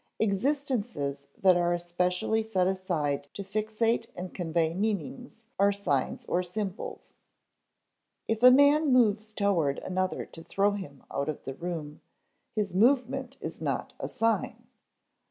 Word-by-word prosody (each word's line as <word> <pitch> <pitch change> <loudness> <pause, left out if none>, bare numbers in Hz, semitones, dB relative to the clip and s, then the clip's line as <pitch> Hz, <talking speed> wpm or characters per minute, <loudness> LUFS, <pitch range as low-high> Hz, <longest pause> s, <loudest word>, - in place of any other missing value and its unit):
Existences 215 - -1
that 185 -2 +5
are 175 0 +2
especially 180 +5 0
set 215 -5 0
aside 165 -7 -1
to 200 - -4
fixate 220 +3 0
and 180 +1 -6
convey 165 -2 0
meanings 220 - -3 0.2
are 200 +1 +5
signs 170 -10 -1
or 180 - +1
symbols. 190 +2 -5 1.1
If 225 0 -1
a 250 - +10
man 285 +3 +5
moves 215 -3 +3
toward 190 -10 +1
another 185 0 -2
to 165 - -12
throw 200 +4 +2
him 185 -10 -7
out 140 +2 -1
of 155 - -5
the 135 - -5
room, 155 -1 -5 0.5
his 205 -4 -1
movement 260 +4 +2
is - - -6
not - - -2
a - - -3
sign. 225 0 -1
195 Hz, 135 wpm, -29 LUFS, 175-225 Hz, 1.1 s, a